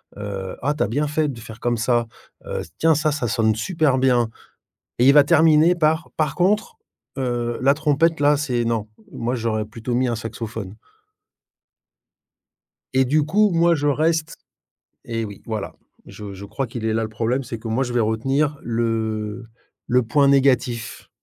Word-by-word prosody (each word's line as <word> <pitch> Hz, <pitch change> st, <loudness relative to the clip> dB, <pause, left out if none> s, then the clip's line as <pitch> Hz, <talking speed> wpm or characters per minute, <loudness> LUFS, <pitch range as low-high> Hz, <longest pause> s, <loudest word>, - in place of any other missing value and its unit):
Heu, 100 Hz, -2 st, -5 dB
ah, 145 Hz, +3 st, +1 dB
tu 150 Hz, -, -6 dB
as -, -, 0 dB
bien 145 Hz, +6 st, -1 dB
fait 150 Hz, +1 st, 0 dB
de 130 Hz, -5 st, -6 dB
faire 110 Hz, 0 st, -11 dB
comme 120 Hz, 0 st, 0 dB
ça. 120 Hz, 0 st, +1 dB, 0.4 s
Heu, -, -, -4 dB
s -, -, -10 dB
tiens, 160 Hz, -1 st, +3 dB
ça, 155 Hz, +1 st, +1 dB
ça 140 Hz, -5 st, -2 dB
sonne 110 Hz, -1 st, +2 dB
super 150 Hz, -, +1 dB
bien». 125 Hz, -3 st, +2 dB, 0.7 s
Et 125 Hz, -, +5 dB
il 140 Hz, -, +7 dB
va 145 Hz, 0 st, +8 dB
terminer 160 Hz, +2 st, +5 dB
par: 160 Hz, 0 st, +1 dB
«Par 150 Hz, -3 st, 0 dB
contre, 210 Hz, -, +1 dB, 0.4 s
heu, 120 Hz, -2 st, -2 dB
la 135 Hz, +2 st, +5 dB
trompette 155 Hz, +2 st, +1 dB
là, 145 Hz, +1 st, +4 dB
c'est 125 Hz, -5 st, -1 dB
non, 115 Hz, -2 st, -1 dB, 0.3 s
moi 120 Hz, +2 st, -2 dB
j'aurais 110 Hz, -2 st, -1 dB
plutôt 115 Hz, +3 st, -5 dB
mis 130 Hz, +1 st, +1 dB
un 120 Hz, -, -1 dB
saxophone». 110 Hz, -3 st, -6 dB, 2.2 s
Et 130 Hz, 0 st, +3 dB
du 150 Hz, +4 st, +2 dB
coup, 205 Hz, +8 st, +3 dB
moi 170 Hz, 0 st, +3 dB
je 145 Hz, -1 st, -1 dB
reste 160 Hz, +2 st, 0 dB, 0.7 s
et 115 Hz, -1 st, -3 dB
oui, 100 Hz, -2 st, -8 dB
voilà, 110 Hz, -3 st, -5 dB, 0.3 s
je 105 Hz, -2 st, -9 dB
je 95 Hz, +1 st, -9 dB
crois 135 Hz, +6 st, -4 dB
qu'il 115 Hz, -1 st, -6 dB
est 110 Hz, -, +1 dB
là 115 Hz, 0 st, 0 dB
le 110 Hz, -, -4 dB
problème, 115 Hz, +4 st, -1 dB
c'est 115 Hz, -2 st, -6 dB
que 115 Hz, -, -8 dB
moi 115 Hz, +4 st, 0 dB
je 120 Hz, -2 st, -4 dB
vais 120 Hz, -, +2 dB
retenir 135 Hz, +7 st, 0 dB
le 115 Hz, -1 st, -2 dB, 0.4 s
le 125 Hz, +1 st, +3 dB
point 140 Hz, +5 st, +3 dB
négatif. 130 Hz, -4 st, +1 dB
125 Hz, 180 wpm, -22 LUFS, 115-150 Hz, 2.2 s, va